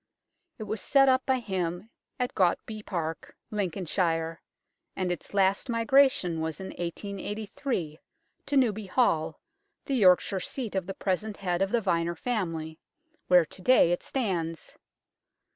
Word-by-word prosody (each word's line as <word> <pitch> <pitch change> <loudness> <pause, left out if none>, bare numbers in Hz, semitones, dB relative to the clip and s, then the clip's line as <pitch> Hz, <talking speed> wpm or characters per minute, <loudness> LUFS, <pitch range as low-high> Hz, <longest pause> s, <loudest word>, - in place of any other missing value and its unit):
It 220 - -6
was 215 +1 -4
set 275 -1 +4
up 260 0 +2
by 265 -1 +3
him 190 -2 -3 0.3
at 250 0 -1
Gautby 215 +3 0
Park, 165 -6 -4 0.2
Lincolnshire, 170 -4 -1 0.5
and 185 -2 -1
its 175 - -5
last 195 +4 +2
migration 230 -6 +3
was 160 -1 -3
in 190 - -6
1883 200 - -4 0.5
to 285 - +1
Newby 220 -6 +2
Hall, 165 - +1 0.5
the 275 - -2
Yorkshire 190 -4 +4
seat 235 +3 -4
of 190 -2 -2
the 195 - -5
present 205 +2 -2
head 180 -2 -1
of 195 - +2
the 235 +2 +1
Vyner 170 -3 0
family, 165 -9 -3 0.5
where 180 -2 +6
to 185 - -11
day 185 -4 +5
it 175 - 0
stands. 170 - -3
190 Hz, 140 wpm, -28 LUFS, 170-220 Hz, 0.5 s, where